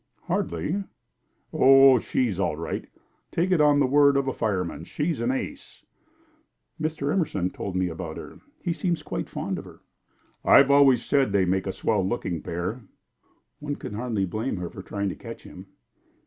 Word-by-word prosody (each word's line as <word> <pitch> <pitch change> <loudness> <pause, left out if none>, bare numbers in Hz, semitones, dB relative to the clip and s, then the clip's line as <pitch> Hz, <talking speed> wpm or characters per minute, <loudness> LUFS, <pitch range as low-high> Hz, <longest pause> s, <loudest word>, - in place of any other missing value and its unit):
"Hardly!" 120 - -2 0.7
"Oh, 135 -1 +7
she's 110 -5 -1
all 85 -5 0
right. 85 - -4 0.4
Take 175 +3 0
it 175 -4 +4
on 145 -1 +5
the 140 - +4
word 140 +1 +5
of 135 -1 0
a 130 - 0
fire 100 -4 0
man, 85 - -7
she's 150 - -2
an 120 - 0
ace." 275 - -5 1.0
"Mr. 155 -2 -1
Emerson 100 - 0
told 95 - -5
me 95 0 +1
about 80 -1 -6
her. - - -10 0.2
He 170 - 0
seems 170 +1 -2
quite - - -4
fond - - -3
of - - -10
her." - - -14 0.6
"I've 140 0 +6
always 135 -4 +5
said 135 -6 +2
they'd 95 -2 +2
make 95 +1 0
a - - 0
swell 105 0 0
looking 90 -5 -2
pair." 90 +9 -4 0.8
"One 145 -1 -4
can - - -8
hardly 110 -3 -1
blame 110 +5 -3
her 90 -2 -5
for - - -9
trying 100 +1 -3
to - - -5
catch - - -10
him." - - -12
120 Hz, 175 wpm, -25 LUFS, 95-145 Hz, 1.0 s, Oh